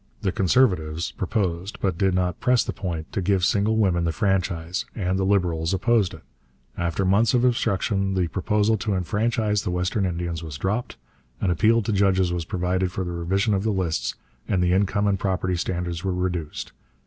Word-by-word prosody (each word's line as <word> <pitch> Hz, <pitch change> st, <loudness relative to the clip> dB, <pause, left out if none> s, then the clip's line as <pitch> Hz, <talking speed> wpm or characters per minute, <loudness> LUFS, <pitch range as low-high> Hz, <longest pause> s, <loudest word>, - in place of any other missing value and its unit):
The 95 Hz, -, +1 dB
'Conservatives' 90 Hz, -6 st, +1 dB
proposed, 95 Hz, -1 st, -2 dB
but 95 Hz, -3 st, 0 dB
did 95 Hz, +1 st, +1 dB
not 90 Hz, -2 st, 0 dB
press 125 Hz, -1 st, +3 dB
the -, -, -4 dB
point, 85 Hz, -5 st, -5 dB
to 100 Hz, -, -1 dB
give 95 Hz, -1 st, +2 dB
single 105 Hz, +3 st, +2 dB
women 90 Hz, -5 st, +2 dB
the 85 Hz, -, +1 dB
franchise, 90 Hz, 0 st, -1 dB
and 95 Hz, -2 st, -1 dB
the -, -, +1 dB
'Liberals' 90 Hz, -3 st, +1 dB
opposed 105 Hz, 0 st, +2 dB
it. -, -, -15 dB, 0.5 s
After 85 Hz, +2 st, -1 dB
months 110 Hz, +6 st, +3 dB
of 125 Hz, 0 st, +3 dB
obstruction 100 Hz, -4 st, +1 dB
the 90 Hz, -2 st, +1 dB
proposal 105 Hz, +5 st, +1 dB
to 105 Hz, -1 st, -1 dB
enfranchise 105 Hz, +3 st, 0 dB
the 100 Hz, -, -3 dB
western 90 Hz, +3 st, 0 dB
Indians 85 Hz, -2 st, -3 dB
was 80 Hz, -4 st, -7 dB
dropped, 105 Hz, -, -2 dB, 0.4 s
an 95 Hz, -, +1 dB
appeal 110 Hz, +6 st, +3 dB
to 105 Hz, -, -1 dB
judges 95 Hz, -2 st, +2 dB
was 85 Hz, -2 st, -2 dB
provided 90 Hz, +1 st, -1 dB
for 95 Hz, -, -3 dB
the 90 Hz, -, -4 dB
revision 95 Hz, +5 st, 0 dB
of 95 Hz, -, +1 dB
the 110 Hz, -, 0 dB
lists, 95 Hz, -6 st, -1 dB, 0.3 s
and 90 Hz, -2 st, +1 dB
the 90 Hz, 0 st, +2 dB
income 100 Hz, +2 st, +1 dB
and 100 Hz, -2 st, +1 dB
property 95 Hz, -1 st, 0 dB
standards 90 Hz, 0 st, -3 dB
were 95 Hz, -2 st, -1 dB
reduced. 90 Hz, -4 st, -3 dB
95 Hz, 185 wpm, -24 LUFS, 90-100 Hz, 0.5 s, press